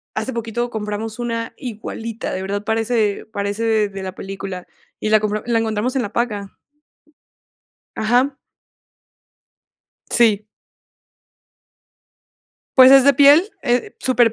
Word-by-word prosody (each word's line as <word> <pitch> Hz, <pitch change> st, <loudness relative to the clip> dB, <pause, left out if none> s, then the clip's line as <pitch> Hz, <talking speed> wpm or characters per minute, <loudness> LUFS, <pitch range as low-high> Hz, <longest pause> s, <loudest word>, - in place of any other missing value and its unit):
hace 220 Hz, +4 st, -3 dB
poquito 235 Hz, +1 st, -3 dB
compramos 215 Hz, 0 st, -5 dB
una 230 Hz, -1 st, -3 dB
igualita, 230 Hz, -2 st, -6 dB
de 185 Hz, -, -3 dB
verdad 200 Hz, +2 st, -3 dB
parece 220 Hz, -1 st, 0 dB
parece 210 Hz, +1 st, 0 dB
de 195 Hz, -1 st, -8 dB
la 185 Hz, -1 st, -6 dB
película, 195 Hz, -2 st, -7 dB, 0.3 s
y 215 Hz, -, -2 dB
la 215 Hz, -, +5 dB
compra 215 Hz, 0 st, -2 dB
la 235 Hz, -1 st, +2 dB
encontramos 225 Hz, +2 st, -1 dB
en 260 Hz, -, +1 dB
la 210 Hz, -2 st, -5 dB
paca. 210 Hz, -5 st, -2 dB, 1.5 s
Ajá. 245 Hz, +5 st, +2 dB, 1.8 s
Sí. 215 Hz, -4 st, +3 dB, 2.3 s
Pues 260 Hz, 0 st, +9 dB
es 270 Hz, -1 st, +8 dB
de 280 Hz, -, +6 dB
piel, 285 Hz, +4 st, +7 dB, 0.2 s
eh, 245 Hz, 0 st, 0 dB
súper 245 Hz, -3 st, +2 dB
225 Hz, 115 wpm, -20 LUFS, 210-240 Hz, 2.3 s, Pues